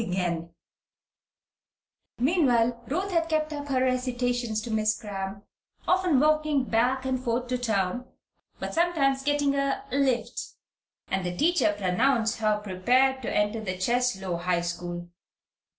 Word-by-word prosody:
Meanwhile, 245 -5 +2
Ruth 370 +8 -2
had 330 -2 +1
kept 310 -1 0
up 290 -1 -5
her 265 -2 +1
recitations 245 -3 0
to 235 - -5
Miss 215 -1 +1
Cramp, 200 -2 -6 0.4
often 365 -6 +3
walking 305 -1 +2
back 255 +3 +1
and 255 -1 -1
forth 240 0 0
to 250 -1 -1
town, 220 +1 -1 0.5
but - - -5
sometimes 310 -6 +2
getting 290 0 +1
"a 275 0 0
lift," 265 -2 0 0.7
and 190 -1 0
the 180 0 -3
teacher 315 -10 +3
pronounced 225 +4 +1
her 215 -1 +2
prepared 250 +8 +2
to 235 - -3
enter 210 +2 0
the 185 -3 -3
Cheslow 190 -4 0
High 175 0 0
School. 175 0 -5
245 Hz, 130 wpm, -27 LUFS, 210-275 Hz, 0.7 s, often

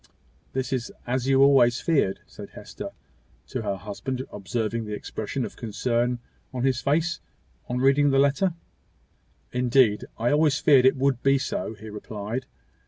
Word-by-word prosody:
"This 130 0 -2
is 125 -2 -2
as 125 +1 -1
you 135 0 +5
always 125 -3 +5
feared," 140 - +1
said - - -11
Hester - - -8 0.6
to 130 - -3
her 100 -3 -2
husband, 110 +7 -5
observing 110 +2 -3
the 105 0 -4
expression 110 +5 -4
of - - -8
concern 120 +2 -1 0.3
in 125 -1 -3
his 130 -2 +1
face, 160 +5 +1 0.5
on 125 - -1
reading 140 +3 +4
the 135 - +3
letter. 140 +6 +2 1.0
"Indeed, 125 -3 +3
I 115 +2 +1
always 150 0 +3
feared 135 -4 +5
it 130 - +3
would 130 -2 +1
be 135 0 +4
so," 130 -4 -3
he 110 +1 -10
replied. 105 +4 -5
125 Hz, 155 wpm, -25 LUFS, 115-135 Hz, 1.0 s, you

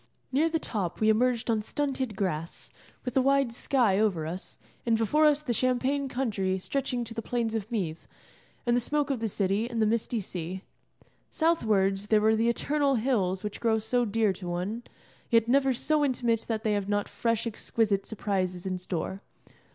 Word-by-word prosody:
Near 300 +5 +3
the 325 - +1
top 200 - -3
we 215 - +3
emerged 240 +2 +2
on 220 -1 +1
stunted 265 -1 -2
grass, 170 -4 -3 0.3
with 250 - -2
the 265 - +4
wide 275 -2 +2
sky 235 -6 +2
over 190 -8 +1
us, 175 +4 -6 0.3
and 230 -2 +2
before 295 +8 +3
us 300 0 +2
the 245 - -1
champaign 260 +3 +1
country 205 -8 -1
stretching 250 +4 -2
to 225 -1 -7
the 225 - -3
plains 230 -1 -1
of 220 0 -3
Meath, 175 -8 -3 0.6
and 240 0 +3
the - - +4
smoke 290 +3 0
of 265 - -1
the 225 -1 -1
city, 200 +4 0
and 235 -2 -3
the 220 - +4
misty 230 +1 0
sea. 185 -1 -5 0.7
Southwards 210 - +1
there 215 0 +4
were 220 +1 +4
the 225 +2 +2
eternal 280 +3 +1
hills 215 -6 0
which 210 -1 -5
grow 225 -2 +2
so 245 +3 +1
dear 220 -2 +1
to 185 -1 -8
one, 180 +7 -3 0.5
yet 230 -2 +4
never 270 +2 +4
so 300 +4 +1
intimate 240 -4 +1
that 220 -2 -2
they 215 -2 +1
have 205 -1 -1
not 205 0 0
fresh 230 -1 -1
exquisite 215 -2 0
surprises 185 -4 -2
in 185 -1 -2
store. 180 +2 -4
225 Hz, 185 wpm, -28 LUFS, 195-250 Hz, 0.7 s, the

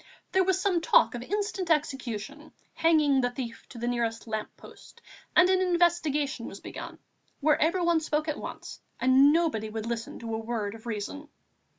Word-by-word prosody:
There 380 0 +4
was 375 0 +1
some 370 -3 +1
talk - - +4
of 240 - -5
instant 400 - -3
execution 285 -2 -2 0.2
hanging 305 -5 +3
the 245 - +1
thief 245 -2 -7
to 245 - -11
the 240 +1 -3
nearest 235 -2 -1
lamp 220 -2 -3
post, - - -15 0.4
and 360 - +7
an 375 0 +3
investigation 330 -8 +1
was 200 - -9
begun, - - -8 0.4
where 305 +1 +2
everyone 340 0 +3
spoke 310 0 -1
at 305 - -2
once - - -8 0.2
and 260 +3 +6
nobody 305 -10 +1
would 220 0 -5
listen 230 -1 -4
to 230 -1 -6
a 220 - -1
word 220 -3 -3
of 225 +1 -11
reason. 235 +7 -5
285 Hz, 175 wpm, -28 LUFS, 230-335 Hz, 0.4 s, and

